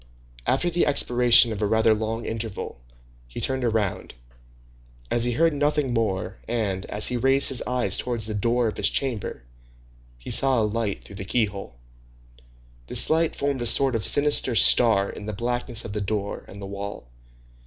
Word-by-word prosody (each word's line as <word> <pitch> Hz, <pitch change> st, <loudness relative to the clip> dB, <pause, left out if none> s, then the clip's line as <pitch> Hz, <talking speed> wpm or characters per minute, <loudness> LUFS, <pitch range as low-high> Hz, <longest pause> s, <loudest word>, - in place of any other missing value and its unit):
After 175 Hz, +7 st, 0 dB
the 170 Hz, -1 st, 0 dB
expiration 120 Hz, -4 st, +4 dB
of 105 Hz, -, -7 dB
a 105 Hz, -, +1 dB
rather 110 Hz, +1 st, +2 dB
long 110 Hz, +2 st, -4 dB
interval, 110 Hz, -, -6 dB, 0.5 s
he -, -, -9 dB
turned 130 Hz, -1 st, -1 dB
round, 105 Hz, -, -3 dB, 1.0 s
as 120 Hz, 0 st, +1 dB
he 120 Hz, -, -1 dB
heard 165 Hz, +6 st, +2 dB
nothing 145 Hz, -2 st, -1 dB
more, 100 Hz, -6 st, -3 dB
and, 105 Hz, -5 st, -3 dB
as 105 Hz, +1 st, 0 dB
he 125 Hz, -, -2 dB
raised 135 Hz, +3 st, +2 dB
his 130 Hz, -, -3 dB
eyes 125 Hz, -6 st, +1 dB
towards 120 Hz, -3 st, -2 dB
the 110 Hz, -, -3 dB
door 115 Hz, +3 st, 0 dB
of 110 Hz, -, -5 dB
his -, -, +1 dB
chamber, 120 Hz, -, -4 dB, 0.7 s
he -, -, -8 dB
saw 135 Hz, -2 st, +3 dB
a -, -, +1 dB
light 105 Hz, -1 st, -3 dB
through 100 Hz, -, -13 dB
the 95 Hz, -, -6 dB
keyhole. 100 Hz, -, -3 dB, 1.1 s
This -, -, +5 dB
light 160 Hz, 0 st, +1 dB
formed 140 Hz, -2 st, -2 dB
a 120 Hz, -, -1 dB
sort 135 Hz, +2 st, +5 dB
of 115 Hz, -3 st, -2 dB
sinister 145 Hz, -4 st, +3 dB
star 110 Hz, -4 st, +5 dB
in 105 Hz, -, -9 dB
the 105 Hz, -, -4 dB
blackness 120 Hz, +1 st, -3 dB
of 100 Hz, -, -7 dB
the 105 Hz, -, -4 dB
door 100 Hz, 0 st, -4 dB
and 100 Hz, -, -12 dB
the 100 Hz, -, -8 dB
wall. 100 Hz, -7 st, -8 dB
115 Hz, 175 wpm, -23 LUFS, 105-125 Hz, 1.1 s, This